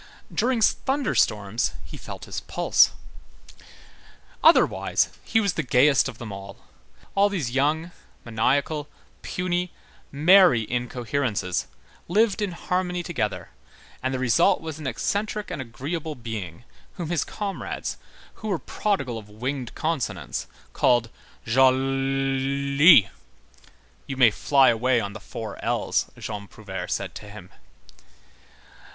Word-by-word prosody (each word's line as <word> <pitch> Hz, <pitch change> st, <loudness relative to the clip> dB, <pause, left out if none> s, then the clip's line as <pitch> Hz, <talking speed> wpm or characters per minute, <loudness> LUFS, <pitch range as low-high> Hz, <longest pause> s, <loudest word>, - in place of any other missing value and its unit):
During 245 Hz, -1 st, +1 dB
thunder 270 Hz, +3 st, +1 dB
storms, 105 Hz, +2 st, +1 dB
he -, -, -10 dB
felt -, -, -9 dB
his -, -, -5 dB
pulse. -, -, +3 dB, 1.5 s
Otherwise, -, -, +4 dB
he 225 Hz, -, +2 dB
was 200 Hz, -5 st, +1 dB
the -, -, -1 dB
gayest 135 Hz, +1 st, +4 dB
of 120 Hz, -, -10 dB
them 115 Hz, -3 st, -7 dB
all. 100 Hz, 0 st, -9 dB, 0.6 s
All 200 Hz, +1 st, +4 dB
these 165 Hz, -12 st, -2 dB
young, 150 Hz, +6 st, 0 dB, 0.3 s
maniacal, 140 Hz, +6 st, 0 dB, 0.3 s
puny, 180 Hz, 0 st, -2 dB, 0.4 s
merry 160 Hz, -, +6 dB
incoherences 120 Hz, -5 st, -2 dB, 0.4 s
lived 215 Hz, +3 st, +2 dB
in 200 Hz, -4 st, -1 dB
harmony 180 Hz, 0 st, -2 dB
together, 125 Hz, -, -3 dB, 0.5 s
and 130 Hz, -, -1 dB
the 130 Hz, -, -1 dB
result 125 Hz, -3 st, +3 dB
was 160 Hz, -1 st, -7 dB
an 150 Hz, -, -5 dB
eccentric 205 Hz, -, -2 dB
and 145 Hz, -, -4 dB
agreeable 145 Hz, +6 st, -5 dB
being 110 Hz, -, -7 dB, 0.3 s
whom 170 Hz, -2 st, -5 dB
his 170 Hz, -, +1 dB
comrades, 200 Hz, -2 st, -5 dB, 0.4 s
who 220 Hz, -, -5 dB
were 195 Hz, -4 st, 0 dB
prodigal 140 Hz, -, -2 dB
of 105 Hz, -1 st, -14 dB
winged 125 Hz, +3 st, -4 dB
consonants, 160 Hz, -4 st, -3 dB, 0.3 s
called 120 Hz, -2 st, +2 dB, 0.3 s
Jolllly. 135 Hz, -, +4 dB, 1.0 s
"You 135 Hz, -2 st, -5 dB
may 120 Hz, -4 st, +6 dB
fly 135 Hz, +5 st, +4 dB
away 120 Hz, +2 st, +2 dB
on 100 Hz, -2 st, -4 dB
the 110 Hz, -, -8 dB
four 110 Hz, +2 st, -8 dB
L's," -, -, 0 dB
Jean 105 Hz, -2 st, -6 dB
Prouvaire -, -, -7 dB
said -, -, -3 dB
to 105 Hz, -, -10 dB
him. 100 Hz, -3 st, -12 dB
135 Hz, 120 wpm, -25 LUFS, 115-170 Hz, 1.5 s, merry